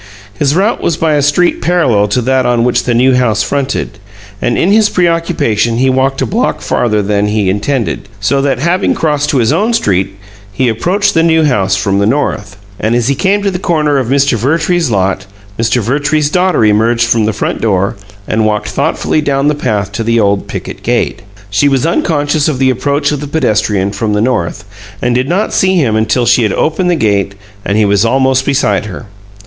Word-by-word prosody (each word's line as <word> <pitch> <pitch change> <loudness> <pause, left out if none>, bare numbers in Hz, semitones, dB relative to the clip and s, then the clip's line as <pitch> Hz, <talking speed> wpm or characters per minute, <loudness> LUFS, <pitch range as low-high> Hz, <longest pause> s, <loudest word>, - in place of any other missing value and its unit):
His 140 +6 0
route 200 +6 +1
was 165 - -1
by 160 -1 +1
a 145 - +2
street 145 +5 +1
parallel 135 -13 +2
to 115 +4 -1
that 130 +1 +1
on 120 -1 +1
which 125 0 0
the 120 - 0
New 130 +2 +3
House 115 -5 +1
fronted, 135 -4 -3 0.4
and 120 - 0
in 185 - +2
his 215 0 +4
preoccupation 165 - 0
he 130 +2 +2
walked 135 +1 0
a - - 0
block 110 - -1
farther 105 -3 0
than 105 +1 0
he 105 -3 0
intended, 110 +4 -2
so 135 +8 0
that, 140 -1 0
having 170 +7 0
crossed 150 -2 0
to 145 - +1
his 115 -3 +2
own 220 +4 +1
street, 95 - 0 0.3
he 125 +6 -1
approached 180 - 0
the 165 - +3
New 160 -1 +3
House 100 -9 +1
from 100 -1 0
the 100 - +1
north, 110 -7 -2 0.2
and 110 +2 0
as 120 +1 0
he - - +3
came 200 +7 0
to 200 - 0
the 180 - -4
corner 150 -5 +1
of 130 - -2
Mr. 140 0 +2
Vertrees's 160 - 0
lot 95 -2 -1 0.3
Mr. 115 +1 +1
Vertrees's 145 +5 0
daughter 180 -9 +2
emerged 115 +3 +2
from 115 -2 +1
the 110 - +1
front 105 - -3
door 100 -3 0 0.3
and 110 0 0
walked 105 -1 -1
thoughtfully 155 - -1
down 140 -1 0
the - - +1
path 105 -9 -2
to 100 +3 -3
the 115 +1 +1
old 100 -2 0
picket - - -7
gate. - - -1 0.3
She 140 +8 +2
was 135 +1 0
unconscious 150 -3 0
of 150 -4 -1
the 130 0 +2
approach 140 +3 -1
of 145 - -2
the 145 - -5
pedestrian 105 -9 0
from 105 0 -2
the 105 - 0
north, 110 -4 -2 0.3
and 120 - 0
did 130 +3 0
not 195 +5 -1
see 190 0 +2
him 130 -11 +1
until 110 +3 +1
she 120 - +3
had 105 -4 0
opened 180 +3 0
the 175 - +2
gate 100 - 0 0.3
and 100 - -1
he 110 - +3
was 100 +1 +2
almost 130 +2 +1
beside 105 -8 0
her. 105 +3 -8
125 Hz, 210 wpm, -12 LUFS, 105-150 Hz, 0.4 s, his